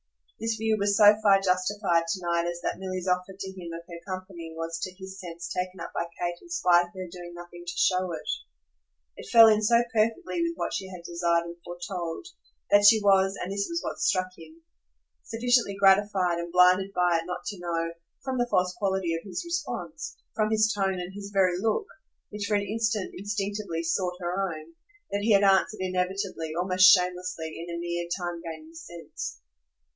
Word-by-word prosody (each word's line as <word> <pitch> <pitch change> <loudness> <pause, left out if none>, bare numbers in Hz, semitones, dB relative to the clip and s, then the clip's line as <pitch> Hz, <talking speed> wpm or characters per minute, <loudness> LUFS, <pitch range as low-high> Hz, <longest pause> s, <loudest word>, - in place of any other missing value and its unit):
This 225 0 -1
view 220 0 +1
was 200 0 +2
so 205 0 +9
far 200 -2 +5
justified 185 -2 +1
to 185 +3 -2
night 170 0 +1
as 175 0 -3
that - - -3
Milly's 185 -1 -4
offer 180 +1 0
to 190 -1 -6
him 175 -3 -8
of 165 0 -7
her 170 -2 -9
company 185 -3 -6
was 165 0 -4
to 185 - -4
his 190 0 -9
sense 170 -2 -7
taken 180 0 -4
up 170 - -7
by 170 - -1
Kate 175 0 -3
in 350 - -16
spite 175 - +4
of 175 - -22
her 185 -1 -6
doing 175 -1 -9
nothing 175 0 -10
to 175 - -3
show 185 -1 +2
it. 155 -2 -6 0.9
It - - -10
fell 230 -1 +9
in 215 -1 +4
so 235 +2 +4
perfectly 230 - 0
with 335 0 0
what - - -3
she 190 - -3
had 180 -2 -10
desired 170 0 0
and 170 0 -8
foretold 175 - -5 0.5
that 205 0 +6
she 220 +1 +8
was 195 -1 +4
and 180 - -4
this 200 0 -1
was 335 0 -1
what - - -2
most - - +2
struck 185 0 +1
him 320 - -15 0.6
sufficiently 235 -2 +1
gratified 195 -3 +4
and 170 0 -5
blinded 180 +2 +5
by 175 -2 +3
it 165 - -11
not 180 0 -5
to 205 -3 -5
know, 165 -1 -2 0.3
from 260 -1 -2
the 245 - +1
false 180 -3 +2
quality 190 -4 0
of 165 - -2
his 190 - -5
response, 340 0 -4 0.2
from 215 -1 +1
his 215 0 +3
tone 195 -2 0
and 180 +1 -6
his 200 0 -7
very 185 -3 +2
look, 225 - 0 0.5
which 210 0 -4
for 210 - +1
an 200 0 0
instant 220 -1 -1
instinctively 200 -3 -3
sought 180 +2 -1
her 185 +2 -1
own, 160 0 -9 0.4
that 200 - -1
he 215 +1 +3
had 200 0 +5
answered 195 +2 +3
inevitably, 185 -3 -2
almost 185 +1 +6
shamelessly, 180 -3 0
in 170 0 -6
a - - -4
mere 170 0 -3
time 175 -2 -4
gaining 160 -1 -9
sense. 165 +1 -8
185 Hz, 200 wpm, -27 LUFS, 175-205 Hz, 0.9 s, so